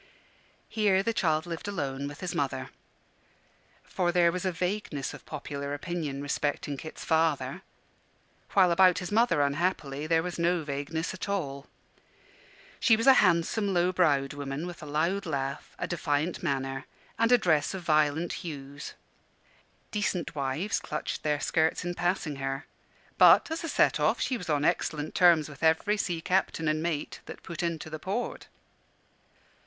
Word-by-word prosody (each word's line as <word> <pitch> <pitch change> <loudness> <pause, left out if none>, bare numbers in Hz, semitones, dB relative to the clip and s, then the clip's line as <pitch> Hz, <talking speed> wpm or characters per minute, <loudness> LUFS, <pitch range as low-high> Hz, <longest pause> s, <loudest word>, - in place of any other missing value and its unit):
Here 200 -3 +2
the 230 - 0
child 160 -6 +1
lived 170 +2 -6
alone 140 -8 -3
with 145 +1 -9
his 180 -2 -3
mother. 135 -2 -2 1.1
For 175 -2 -1
there 170 -1 +4
was 180 +2 -4
a 185 - +1
vagueness 180 -5 -3
of - - -12
popular 140 -1 -5
opinion 150 -4 -4
respecting 145 0 -2
Kit's 155 +3 -8
father; 160 -1 +1 0.9
while 185 -3 +5
about 185 +1 +5
his 180 - -4
mother, 205 -9 +3
unhappily, 145 -1 -1
there 165 0 +3
was 180 0 -5
no 170 0 +2
vagueness 145 +3 -3
at 185 +2 -6
all. 140 -8 -3 1.1
She 225 - +5
was 225 - -1
a 270 - +9
handsome, 185 +2 +2
low 175 +1 +3
browed 145 -7 +2
woman, 140 +2 -4
with 175 -1 -8
a 150 - -8
loud 170 +6 0
laugh, 140 -3 -4
a - - -2
defiant 155 0 -1
manner, 135 -1 -2 0.3
and 230 +1 +3
a 245 - +8
dress 160 -5 +1
of 185 - -6
violent 155 +1 +2
hues. 145 -5 -7 1.0
Decent 190 -7 -1
wives 145 +7 -1
clutched 150 - -4
their 150 -1 0
skirts 160 +2 +1
in 175 - -2
passing 175 -5 -1
her: 135 +1 -3 0.5
but, - - +7
as 325 +1 -3
a 330 - -3
set - - +3
off, - - +2
she 260 - 0
was 180 -8 -6
on 145 -1 +1
excellent 155 -1 0
terms 170 -4 +5
with 145 -3 -12
every 165 +6 +3
sea 175 -5 -2
captain 180 -2 0
and 155 0 +1
mate 160 -3 -3
that - - -9
put 170 - -5
into 170 -3 -2
the 155 0 -6
port. 200 +9 -4
160 Hz, 160 wpm, -28 LUFS, 145-180 Hz, 1.1 s, a